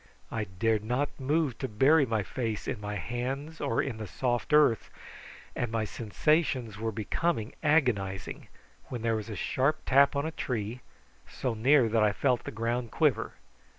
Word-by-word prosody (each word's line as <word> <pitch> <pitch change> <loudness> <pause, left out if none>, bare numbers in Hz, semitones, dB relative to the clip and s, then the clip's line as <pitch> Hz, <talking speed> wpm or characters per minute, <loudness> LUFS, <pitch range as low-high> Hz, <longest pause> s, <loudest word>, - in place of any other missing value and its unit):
I 110 -2 -2
dared 105 +3 0
not 125 +7 -2
move 140 -1 0
to 130 - -2
bury 135 +7 +4
my 110 -2 0
face 115 -1 -3
in 105 - -3
my 105 0 -4
hands 135 - -4
or 140 -5 +1
in 125 -5 -4
the 110 -1 -6
soft 120 - -1
earth, 150 -7 +4 0.7
and 120 -2 -2
my 115 -1 0
sensations 120 - 0
were 110 0 -1
becoming 115 - -1
agonising, 115 - 0 0.4
when 120 -3 -6
there 115 -1 +2
was 110 0 -4
a 105 - -5
sharp 135 +10 0
tap 140 +2 +5
on 140 +1 0
a 160 - -2
tree, 120 -5 -3 0.5
so 125 - -2
near 125 +3 +4
that 110 0 +2
I 105 -1 +3
felt 125 +2 +1
the - - -4
ground 115 +2 -2
quiver. 130 -5 +1
120 Hz, 170 wpm, -29 LUFS, 110-140 Hz, 0.7 s, tap